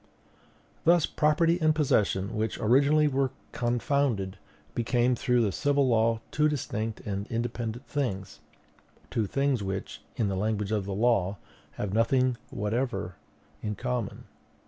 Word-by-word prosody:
"Thus 170 -1 +5
property 165 +3 +2
and 155 -1 +4
possession, 105 -8 +1
which 110 +1 -1
originally 140 +7 +4
were 135 -1 +1 0.2
confounded, 120 -5 0 0.3
became 120 +1 +2
through 125 -1 +2
the 105 - +1
civil 140 +4 +2
law 115 -1 +2
two 150 0 +3
distinct 110 -6 -3
and 100 0 -4
independent 115 0 -3
things; 95 - -3 0.7
two 110 -3 0
things 135 0 +1
which, 95 -1 -4
in 110 - 0
the 95 - -1
language 105 +1 -1
of 105 -3 0
the 100 -1 -3
law, 100 -3 +2 0.4
have 100 -2 -4
nothing 125 +2 +2
whatever 105 -3 -2 0.5
in 105 -1 -3
common. 125 -3 -3
115 Hz, 130 wpm, -28 LUFS, 105-135 Hz, 0.7 s, Thus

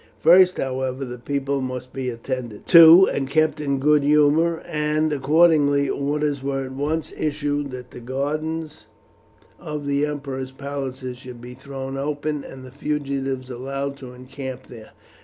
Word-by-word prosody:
First, 180 +2 +5
however, 130 0 -2
the 125 -1 -8
people 140 +1 -2
must 130 0 -5
be 130 -1 -3
attended 120 -2 -6
to 170 +2 +9
and 135 -1 -2
kept 155 0 +1
in 140 -2 0
good 150 +2 +4
humour, 150 +3 +3
and 150 0 0
accordingly 145 0 +3
orders 145 0 -1
were 135 0 -2
at 130 - -8
once 150 +4 -3
issued 145 -1 -2
that 125 -1 -9
the - - -10
gardens 155 +5 -4 0.7
of 150 -1 -6
the 140 +1 +1
emperor's 135 -3 -5
palaces 130 -2 -6
should 125 -2 -10
be 125 +1 -10
thrown 135 +1 -7
open, 145 +1 -3
and 130 -1 -10
the 130 - -12
fugitives 135 -3 -3
allowed 135 +3 -4
to 130 -2 -10
encamp 130 0 -8
there. 110 -3 -12
140 Hz, 150 wpm, -22 LUFS, 130-150 Hz, 0.7 s, to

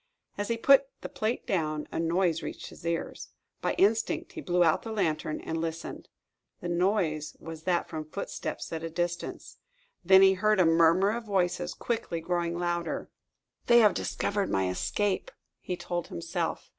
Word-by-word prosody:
As 205 - -3
he 230 - 0
put 275 +3 +6
the - - -6
plate 250 -5 -2
down, 155 -5 -1
a - - -3
noise 165 0 +1
reached 150 - -6
his 170 - -9
ears. 170 -1 -3 0.3
By - - 0
instinct, 225 - +1
he 340 -5 -7
blew 180 -7 +2
out 160 -2 +3
the 225 - -6
lantern 160 -7 -1
and 160 0 -3
listened. 165 0 -5 0.5
The 175 - -5
noise 170 -4 0
was 165 -1 -8
that 180 -2 +1
from 155 -1 -6
footsteps 200 -1 -5
at 160 - -3
a 165 - -4
distance. 175 +1 -4 0.5
Then 190 +2 +7
he 190 0 +7
heard 215 +2 +2
a 180 - +6
murmur 165 +4 +5
of 230 +1 -4
voices, 190 -4 0
quickly 225 -8 -2
growing 170 0 -1
louder. 175 -1 -2 0.6
"They 240 - +7
have 210 -3 +6
discovered 200 -1 -1
my 95 -1 +1
escape," 205 - -1 0.3
he 180 - -4
told 175 -1 -3
himself. 85 - -3
175 Hz, 170 wpm, -29 LUFS, 165-205 Hz, 0.6 s, Then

